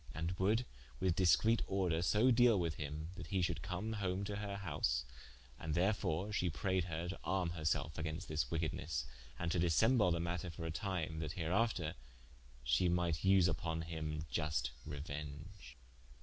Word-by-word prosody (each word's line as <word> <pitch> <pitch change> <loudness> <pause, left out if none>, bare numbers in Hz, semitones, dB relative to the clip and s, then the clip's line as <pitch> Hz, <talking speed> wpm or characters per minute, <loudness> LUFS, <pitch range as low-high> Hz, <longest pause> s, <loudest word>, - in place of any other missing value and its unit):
And 80 +1 -1
would 110 +6 +3 0.3
with 90 -3 +2
discrete 105 +5 +4
order 90 -4 +1
so 105 +9 +4
deale 120 -3 +6
with 85 -3 0
him, 75 +1 -5
that 85 -4 -7
he 95 0 0
should - - -1
come 100 +5 -3
home 95 -2 -1
to 100 0 -3
her 100 -1 -3
house, 65 -10 0 0.5
and 80 -1 -2
therefore 95 0 +1
shee 90 -3 +1
prayed 95 +2 0
her 85 -1 -3
to 95 - -5
arme 95 -3 0
herselfe 80 -1 -1
against 80 0 -3
this 75 -5 -1
wickednes, 75 -5 -2 0.3
and 85 - -1
to 90 - +1
dissemble 105 +5 +4
the 85 -1 +1
matter 85 +1 -2
for 80 0 -6
a 80 - -2
time, 80 -3 -2
that 80 -1 -3
hereafter 90 -1 0 0.7
she 65 +9 +3
might 85 -2 +1
vse 95 +1 +5
vpon 80 0 -1
him 80 -2 -4
iust 65 -5 0 0.2
reuenge. 75 +2 -7
85 Hz, 165 wpm, -37 LUFS, 80-95 Hz, 0.7 s, deale